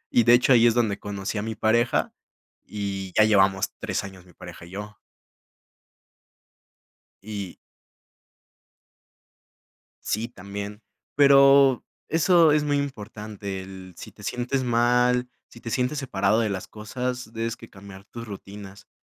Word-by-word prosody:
Y 120 - +5
de 120 - +7
hecho, 125 +2 +4
ahí 120 -1 +6
es 115 - +2
donde 110 -4 +1
conocí 100 0 -4
a - - -2
mi 110 +1 -4
pareja, 115 +3 +1 0.5
y 100 -3 -5
ya 110 - +7
llevamos 95 -3 +3
3 - - -3
años 95 -2 -11
mi 90 - -19
pareja 90 -1 -11
y - - -14
yo. 105 +2 -8 2.3
Y 100 -4 -6 2.5
Sí, 110 +2 -1
también. 100 0 -8 0.3
Pero, 140 -2 +6 0.2
eso 165 0 +4
es 150 0 +2
muy 145 -1 +1
importante, 105 -7 -5
el 95 -1 -11
si - - -10
te - - -15
sientes 125 +2 -2
mal, 125 +1 +2 0.2
si 120 - -16
te 115 - -7
sientes 125 +4 -1
separado 110 -4 +1
de 110 -2 0
las 95 -2 -4
cosas, 125 +2 -5
debes 115 0 -3
que 115 - -14
cambiar 100 -1 -13
tus 115 -1 -9
rutinas. 100 -1 -10
110 Hz, 140 wpm, -25 LUFS, 100-125 Hz, 2.5 s, de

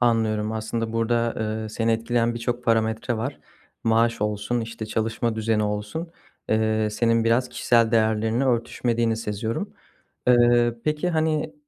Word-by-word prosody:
Anlıyorum. 110 -3 +1
Aslında 110 +1 -3
burada, 115 0 +1
ııı, 110 0 -3
seni 115 +1 0
etkileyen 115 +1 0
birçok 120 +1 -3
parametre 115 +1 +1
var. 130 +6 -4 0.4
Maaş 115 0 +2
olsun, 105 +3 -1
işte, 115 -1 -6
çalışma 110 +1 -1
düzeni 110 -1 +1
olsun, 105 +11 -3 0.4
ııı, 110 0 +1
senin 115 +1 +2
biraz 120 +2 +2
kişisel 115 -2 +2
değerlerinle 110 +2 +2
örtüşmediğini 120 -2 0
seziyorum. 110 0 -3 0.6
Iıı, 120 -1 +4
peki, 155 +3 0
hani, 155 -1 0
115 Hz, 130 wpm, -24 LUFS, 110-120 Hz, 0.6 s, Iıı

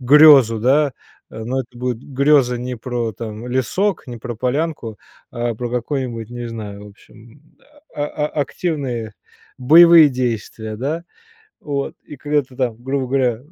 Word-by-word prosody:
грезу, 135 -4 +7
да, 140 +4 +3 0.4
э. 110 - -8
Но 130 +3 -1
это 125 -1 -11
будет 125 -2 -2
греза 135 -2 +2
не 125 +1 -5
про, 120 -1 -3
там, 110 +2 -7
лесок, 130 - -1
не 120 -2 -8
про 120 +1 -6
полянку, 125 - -2 0.3
а 120 0 -2
про 120 +2 -5
какой-нибудь, 120 -2 -3
не 120 0 -6
знаю 105 -3 -7
в - - -11
общем, 110 +5 -19 0.5
а 145 - -2
а 150 0 -2
активные 140 - -3 0.5
боевые 165 +4 +8
действия, 115 -3 -3
да. 150 +8 -3 0.6
Вот, 140 -2 -3
и 150 - -10
когда 145 +2 0
ты 130 -1 -18
там, 125 -4 -1
грубо 135 +1 -2
говоря, 125 -3 +1
125 Hz, 150 wpm, -19 LUFS, 115-145 Hz, 0.6 s, боевые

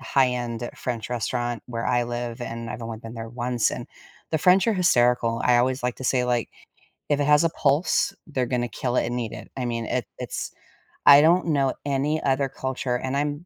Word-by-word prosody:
high-end 125 -3 0
French 115 -3 -4
restaurant 120 0 -2
where 115 -1 -4
I 120 -1 +2
live 120 0 -4
and 115 -1 -5
I've 120 - -6
only 115 -1 -5
been 115 +1 -9
there 115 -1 -6
once 120 0 0
and - - -6 0.4
the 160 - +1
French 185 +6 +4
are 225 - +3
hysterical. 120 -9 +2
I 125 -1 +5
always 130 +2 +1
like 125 -1 -1
to 130 - -8
say, 125 0 +2
like, 120 -2 0 0.6
"If 145 -1 +2
it 145 - +1
has 150 +2 +5
a 165 - +3
pulse, 155 +6 +1
they're 130 -5 -1
gonna 120 0 -1
kill 125 +2 -3
it - - +2
and 120 +1 -2
eat 115 -3 -4
it." - - -10
I 130 - -2
mean, 115 -1 -2
it - - -1
it's - - -4 0.5
I 140 0 +10
don't 170 +3 +4
know 140 -4 +2
any 145 +2 0
other 135 0 +1
culture 130 -1 -3
and 130 +2 -3
I'm 145 +3 -2
125 Hz, 210 wpm, -24 LUFS, 120-140 Hz, 0.6 s, I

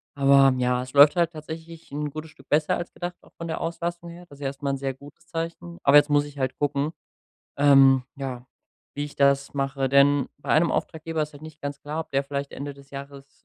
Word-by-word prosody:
aber 140 -1 +5
ja, 125 0 +1
es 130 - -11
läuft 145 +3 +8
halt 170 -1 +2
tatsächlich 160 +1 -9
’n 150 +1 -3
gutes 155 +1 -8
Stück 165 - -20
besser 150 +1 +2
als 175 - -6
gedacht, 175 0 -5
auch - - -22
von 170 - -7
der 160 - -4
Auslastung 170 +1 -4
her. 175 +1 -11
Das 140 - -14
ist - - -17
ja - - 0
erst 135 0 -7
mal 140 - -1
’n 135 - -2
sehr 135 0 -3
gutes 145 +5 -16
Zeichen. 170 +1 -5
Aber 140 +1 +7
jetzt 145 0 +5
muss 145 0 +3
ich 145 -1 -12
halt 130 -1 -1
gucken, 145 +1 0 0.7
ähm, 135 -2 +6
ja, 130 -3 -6 0.5
wie 145 - -1
ich 145 - -10
das 140 0 +2
mache. 135 -1 -1
Denn 140 +1 +4
bei - - -6
einem 165 +2 +4
Auftraggeber 160 0 -2
ist 150 - -5
halt 145 +1 -14
nicht 155 -1 -11
ganz 140 0 -5
klar, 150 +2 -4
ob 160 - -8
der 135 0 +1
vielleicht 140 0 -4
Ende 140 0 -6
des 140 0 -17
Jahres 140 0 -11
145 Hz, 235 wpm, -25 LUFS, 140-160 Hz, 0.7 s, läuft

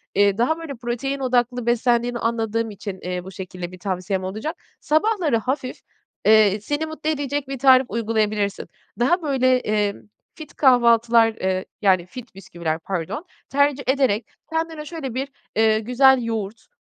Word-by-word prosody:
eee, 200 0 +3
daha, 250 +7 +1
böyle, 320 -4 -6
protein 245 +3 -3
odaklı 245 -2 0
beslendiğini 240 0 +1
anladığım 230 -1 -1
için, 200 -1 -7
eee, 180 0 -4
bu 190 - -9
şekilde 180 -1 -7
bir 185 - -12
tavsiyem 185 0 -2
olacak. 215 - -4 0.2
Sabahları 315 - +1
hafif, 255 +3 -3 0.5
eee, 215 -2 +5
seni 290 +8 -2
mutlu 315 0 -4
edecek 285 -2 -2
bir 270 -1 -5
tarif 260 0 +6
uygulayabilirsin. 215 -2 -1 0.3
Daha, 310 +10 +2
böyle, 260 -4 +2
emm, 210 - -1 0.3
fit 310 -2 -11
kahvaltılar, 235 -3 +5
eee, 185 -2 -2 0.2
yani, 185 -4 +3
fit 245 +3 -11
bisküviler, 170 -4 -4
pardon, 185 - -4 0.2
tercih 285 0 +2
ederek 260 -5 +2 0.3
kendine 320 -1 -2
şöyle 300 -6 -6
bir, 265 +3 -2 0.3
eee, 220 0 +3
güzel 250 +3 +4
yoğurt, 225 -1 -4
235 Hz, 145 wpm, -22 LUFS, 205-270 Hz, 0.5 s, tarif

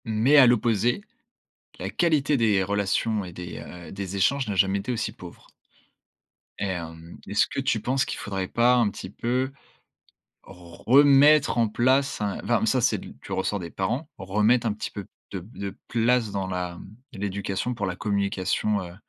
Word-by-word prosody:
Mais 115 +6 +3
à 135 -3 +9
l'opposé, 120 - +2 0.8
la - - -4
qualité 155 -4 +2
des 110 -5 +3
relations 100 +2 0
et 90 - -8
des, 90 +1 -8
heu, 90 -1 -10
des 95 -1 -5
échanges 135 +8 +1
n'a 100 - -2
jamais 95 +1 +2
été 105 +6 -4
aussi 120 - -2
pauvre. - - -13 1.1
Et - - -1
hem, 85 -3 -6
est-ce 105 +3 +2
que - - -4
tu 130 -4 0
penses 130 +5 0
qu'il - - -5
faudrait 95 -2 -3
pas 120 +4 +3
un 120 -4 +3
petit 95 - -8
peu, 125 +6 -1 0.9
remettre 135 - +4
en 115 -2 +3
place 130 +5 +1
un 105 -1 -2
enfin, - - +1
mais - - 0
ça - - +2
c'est - - +2
de - - -10
l - - -11
du - - -8
ressort 100 +2 -1
des 85 -2 -7
parents, 120 - -2
remettre 105 +5 +2
un 110 - +1
petit 105 - -5
peu 100 -3 -7 0.2
de 95 - -5
de 100 -1 -6
place 120 -1 +2
dans 100 -1 -2
la, 90 -1 -3
hem, 95 +4 -12 0.2
de - - -10
l'éducation 100 +4 -2
pour 105 -3 -3
la 90 -1 -3
communication, 100 0 -1
heu, 85 -1 -9
105 Hz, 185 wpm, -25 LUFS, 95-125 Hz, 1.1 s, à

